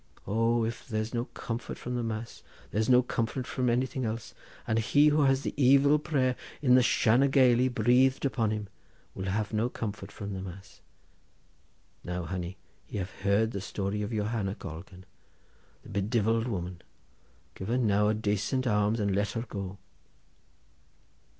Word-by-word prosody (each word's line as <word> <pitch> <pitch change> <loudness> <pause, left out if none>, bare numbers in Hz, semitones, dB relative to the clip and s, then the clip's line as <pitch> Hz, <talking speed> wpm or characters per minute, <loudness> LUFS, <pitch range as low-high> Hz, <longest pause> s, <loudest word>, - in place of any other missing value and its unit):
Oh, 115 +2 +2
if 115 +1 -4
there's 110 -1 -2
no 120 0 -1
comfort 115 -1 -6
from 125 - -5
the 120 - -1
mass 115 0 -5 0.3
there's 110 +2 0
no 125 0 +6
comfort 125 +2 -2
from 125 0 -1
anything 130 +2 0
else, 115 -1 -4 0.3
and 110 0 +1
he 145 +7 +4
who 150 0 +3
has 135 0 +2
the - - -2
evil 140 +2 +5
prayer 130 -4 +1 0.2
in 130 -4 +4
the 130 - +7
Shanna 120 +2 +4
Gailey 130 -2 +4
breathed 130 +2 +3
upon 120 -5 +1
him, 105 -1 -3 0.5
will 95 - -5
have 105 +3 -1
no 110 +3 +1
comfort 110 -4 -5
from 100 -1 -6
the 95 - -4
mass. 95 +1 -10 1.2
Now, 90 0 -3
honey, 90 +1 -5 0.3
ye - - -5
have 95 0 -3
heard 100 +3 +2
the 100 - -4
story 100 +1 -3
of 105 - -2
Johanna 105 -2 -1
Colgan, 90 +2 -9 0.8
the - - -13
bedivilled 110 +3 +1
woman. 90 -5 -4 0.7
Give 95 - -7
her 120 +3 +1
now 105 -4 +3
a 110 - +2
dacent 105 +5 -1
alms 105 0 +2
and 100 -2 +1
let 105 +1 0
her 115 - -2
go!" 100 -4 -6
110 Hz, 165 wpm, -29 LUFS, 100-125 Hz, 1.2 s, the